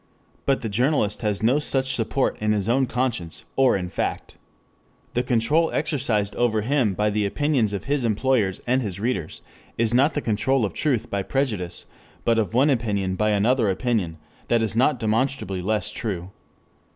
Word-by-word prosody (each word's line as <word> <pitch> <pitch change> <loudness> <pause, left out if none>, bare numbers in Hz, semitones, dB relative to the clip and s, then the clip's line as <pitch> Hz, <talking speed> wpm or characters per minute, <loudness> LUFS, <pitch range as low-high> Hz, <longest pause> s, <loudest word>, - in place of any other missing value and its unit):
But 135 -1 +2
the 115 - -3
journalist 110 0 +1
has 105 -2 -1
no 125 +6 +4
such 135 -2 0
support 125 +3 0
in 105 0 +1
his 100 -1 -1
own 130 +3 +2
conscience 120 -10 -2
or 135 -5 +4
in 90 -2 -4
fact. - - -3 0.8
The 120 - +1
control 125 +7 +2
exercised 120 -9 0
over 115 -3 +2
him 120 -4 +1
by 105 +1 +1
the 105 0 0
opinions 125 0 +1
of 100 - -4
his 140 -1 -1
employers 110 -3 +1
and 130 +2 +2
his 100 -5 -4
readers, 110 -8 -3 0.3
is 115 0 +2
not 140 +5 +3
the - - +1
control 120 +2 +1
of 95 - -4
truth 130 -8 -1
by 100 - 0
prejudice, 105 -7 -2 0.4
but 115 -1 +3
of 110 +1 -2
one 140 +4 +4
opinion 105 -7 0
by 105 +3 +1
another 110 +2 +2
opinion 95 -5 -1 0.3
that 115 -1 +2
it - - +3
is 110 -1 -4
not 130 +3 +3
demonstrably 110 -4 -1
less 105 +2 -1
true. 100 -7 -4
115 Hz, 175 wpm, -24 LUFS, 105-130 Hz, 0.8 s, no